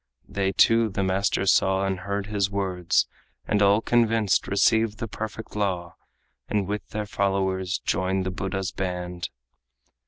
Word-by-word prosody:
They 95 Hz, -1 st, -1 dB
too 115 Hz, +3 st, +4 dB
the 100 Hz, 0 st, -2 dB
master 95 Hz, +1 st, +1 dB
saw, 95 Hz, 0 st, +3 dB
and 95 Hz, -1 st, -1 dB
heard 100 Hz, +1 st, -3 dB
his 100 Hz, -2 st, 0 dB
words, 95 Hz, -3 st, +1 dB, 0.4 s
And 105 Hz, -, +1 dB
all 100 Hz, +2 st, +5 dB
convinced 115 Hz, -4 st, +2 dB
received 110 Hz, +2 st, +2 dB
the 115 Hz, -, -4 dB
perfect 110 Hz, 0 st, -7 dB
law, 90 Hz, -5 st, -2 dB, 0.5 s
And 105 Hz, -2 st, 0 dB
with 105 Hz, +2 st, -4 dB
their 105 Hz, 0 st, -3 dB
followers 95 Hz, -1 st, 0 dB
joined 95 Hz, +1 st, 0 dB
the 95 Hz, -, -1 dB
Buddha's 95 Hz, 0 st, -3 dB
band. 90 Hz, -2 st, -4 dB
100 Hz, 145 wpm, -25 LUFS, 95-105 Hz, 0.5 s, all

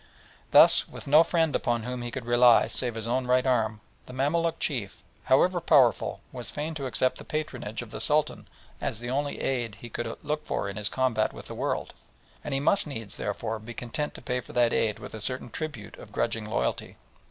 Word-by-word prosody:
Thus, -, -, +7 dB
with -, -, -10 dB
no 150 Hz, +3 st, +7 dB
friend 165 Hz, -2 st, +1 dB
upon 120 Hz, -2 st, 0 dB
whom 125 Hz, +1 st, -4 dB
he 120 Hz, -, -4 dB
could 120 Hz, 0 st, -6 dB
rely 120 Hz, 0 st, +6 dB
save 120 Hz, -3 st, -2 dB
his 115 Hz, -1 st, -4 dB
own 125 Hz, +2 st, -1 dB
right 125 Hz, +1 st, +3 dB
arm, 110 Hz, -4 st, +1 dB, 0.3 s
the 125 Hz, -, -9 dB
Mamaluk 165 Hz, +5 st, 0 dB
chief, 120 Hz, -10 st, -3 dB, 0.2 s
however 175 Hz, +7 st, +3 dB
powerful, 130 Hz, -7 st, +3 dB
was 125 Hz, -2 st, -4 dB
fain 150 Hz, +2 st, -4 dB
to 140 Hz, -4 st, -4 dB
accept 130 Hz, +1 st, 0 dB
the -, -, -8 dB
patronage 125 Hz, -7 st, -4 dB
of 115 Hz, -, -13 dB
the -, -, -4 dB
Sultan 150 Hz, 0 st, +2 dB, 0.3 s
as 110 Hz, -, -2 dB
the 120 Hz, +1 st, -5 dB
only 145 Hz, +2 st, -1 dB
aid 120 Hz, -5 st, -1 dB
he 120 Hz, +3 st, -10 dB
could 120 Hz, -, -3 dB
look 150 Hz, +1 st, -2 dB
for -, -, -1 dB
in 100 Hz, -, -5 dB
his 105 Hz, -1 st, -1 dB
combat 125 Hz, -5 st, +1 dB
with -, -, -10 dB
the -, -, -8 dB
world, -, -, -2 dB, 0.5 s
and 150 Hz, -, -5 dB
he -, -, +1 dB
must 155 Hz, +5 st, +2 dB
needs, 115 Hz, -8 st, -6 dB
therefore, 110 Hz, 0 st, -3 dB
be 115 Hz, +2 st, -9 dB
content 135 Hz, +5 st, -4 dB
to -, -, -11 dB
pay 125 Hz, 0 st, -1 dB
for -, -, -11 dB
that 120 Hz, -1 st, +3 dB
aid 105 Hz, -2 st, +1 dB
with -, -, -10 dB
a 110 Hz, -, -6 dB
certain 130 Hz, +1 st, 0 dB
tribute 145 Hz, -10 st, -6 dB
of -, -, -12 dB
grudging 115 Hz, -2 st, -1 dB
loyalty. 105 Hz, -, -2 dB
125 Hz, 210 wpm, -27 LUFS, 115-145 Hz, 0.5 s, Thus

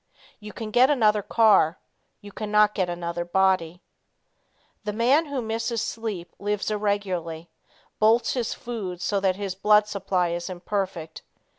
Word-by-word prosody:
You 210 Hz, -1 st, -9 dB
can 220 Hz, -1 st, -7 dB
get 250 Hz, +4 st, +5 dB
another 215 Hz, -7 st, +3 dB
car; 200 Hz, -7 st, +3 dB, 0.4 s
you 205 Hz, -1 st, -11 dB
cannot 210 Hz, 0 st, +2 dB
get 185 Hz, -4 st, -1 dB
another 175 Hz, 0 st, -3 dB
body. 180 Hz, -1 st, +1 dB, 1.0 s
The 210 Hz, 0 st, -3 dB
man 260 Hz, +9 st, +3 dB
who 275 Hz, -4 st, -3 dB
misses 225 Hz, +1 st, -2 dB
sleep 210 Hz, -7 st, -5 dB
lives 205 Hz, +1 st, -2 dB
irregularly 185 Hz, -6 st, -2 dB, 0.5 s
bolts 225 Hz, +3 st, +3 dB
his 245 Hz, -3 st, -2 dB
food 205 Hz, -8 st, -6 dB
so 200 Hz, +3 st, 0 dB
that 190 Hz, -1 st, +1 dB
his 200 Hz, -1 st, -4 dB
blood 210 Hz, +2 st, +4 dB
supply 190 Hz, -3 st, -1 dB
is 170 Hz, +2 st, -4 dB
imperfect. 185 Hz, -3 st, -4 dB
205 Hz, 140 wpm, -25 LUFS, 180-220 Hz, 1.0 s, get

